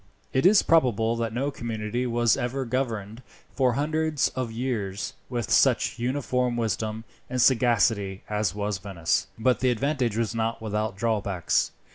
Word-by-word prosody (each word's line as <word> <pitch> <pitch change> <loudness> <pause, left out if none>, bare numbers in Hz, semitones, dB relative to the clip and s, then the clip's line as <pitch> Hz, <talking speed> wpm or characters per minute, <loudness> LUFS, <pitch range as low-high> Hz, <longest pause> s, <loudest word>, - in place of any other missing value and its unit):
It 135 +6 +4
is 205 +1 +6
probable 115 -8 +3
that 115 -1 -2
no 135 +5 -1
community 115 0 -3
was 120 -2 +2
ever 130 +2 -2
governed, 115 -3 -3 0.3
for 130 -3 +2
hundreds 155 +2 0
of 130 -3 -4
years, 110 -5 -3 0.2
with 120 -4 -3
such - - +3
uniform 125 -1 0
wisdom 110 0 -2 0.3
and 125 0 -2
sagacity 115 -6 +2
as 105 -2 -1
was 105 -2 -2
Venice; 90 -4 -1
but 125 +3 +2
the 130 - +2
advantage 125 -2 0
was 115 -1 0
not 115 0 -1
without 105 -2 -2
drawbacks. 100 -5 0
115 Hz, 145 wpm, -26 LUFS, 105-130 Hz, 0.3 s, is